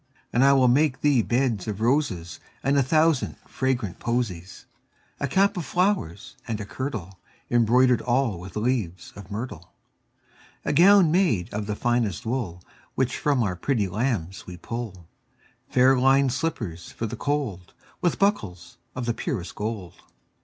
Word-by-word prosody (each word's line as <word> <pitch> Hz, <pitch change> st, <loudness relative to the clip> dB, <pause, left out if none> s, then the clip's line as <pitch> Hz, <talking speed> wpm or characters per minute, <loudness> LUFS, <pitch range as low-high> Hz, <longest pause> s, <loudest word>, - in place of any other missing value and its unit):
And 120 Hz, -, +4 dB
I 140 Hz, -, +6 dB
will 130 Hz, -2 st, +4 dB
make 130 Hz, +1 st, +2 dB
thee 145 Hz, -5 st, +4 dB
beds 120 Hz, -4 st, 0 dB
of 105 Hz, -2 st, -3 dB
roses 110 Hz, -, 0 dB, 0.2 s
And 140 Hz, +2 st, +2 dB
a 140 Hz, -, +5 dB
thousand 155 Hz, +1 st, +2 dB
fragrant 125 Hz, -8 st, -2 dB
posies; 110 Hz, -8 st, -3 dB, 0.5 s
10 140 Hz, -, -1 dB
A -, -, -12 dB
cap 195 Hz, +5 st, +2 dB
of 175 Hz, -, -2 dB
flowers, 180 Hz, -, -1 dB
and 110 Hz, -3 st, -3 dB
a 105 Hz, -, -5 dB
kirtle 105 Hz, -7 st, -5 dB, 0.3 s
Embroider'd 120 Hz, +1 st, +4 dB
all 120 Hz, -6 st, 0 dB
with 90 Hz, +1 st, -10 dB
leaves 105 Hz, -7 st, -2 dB
of 100 Hz, -2 st, -11 dB
myrtle. 100 Hz, -6 st, -6 dB, 0.9 s
A -, -, 0 dB
gown 185 Hz, -1 st, +6 dB
made 165 Hz, -, +1 dB
of 105 Hz, 0 st, -3 dB
the 105 Hz, -, -2 dB
finest 120 Hz, -5 st, 0 dB
wool 110 Hz, -8 st, -3 dB, 0.3 s
Which 130 Hz, -1 st, 0 dB
from 140 Hz, -5 st, +1 dB
our 95 Hz, -4 st, -1 dB
pretty 110 Hz, +1 st, 0 dB
lambs 95 Hz, -4 st, -2 dB
we 90 Hz, -1 st, -8 dB
pull; 95 Hz, -4 st, -6 dB, 0.6 s
Fair 130 Hz, +1 st, +5 dB
linèd 135 Hz, +1 st, +4 dB
slippers 120 Hz, -, -3 dB
for 115 Hz, -, -4 dB
the 110 Hz, -, -4 dB
cold, 140 Hz, -11 st, -2 dB
15 -, -, -26 dB, 0.3 s
With 175 Hz, -, +1 dB
buckles 95 Hz, -, -1 dB, 0.2 s
of 130 Hz, -1 st, -3 dB
the 120 Hz, -, 0 dB
purest 115 Hz, -, -4 dB
gold. 105 Hz, -5 st, -5 dB
120 Hz, 160 wpm, -25 LUFS, 95-135 Hz, 0.9 s, I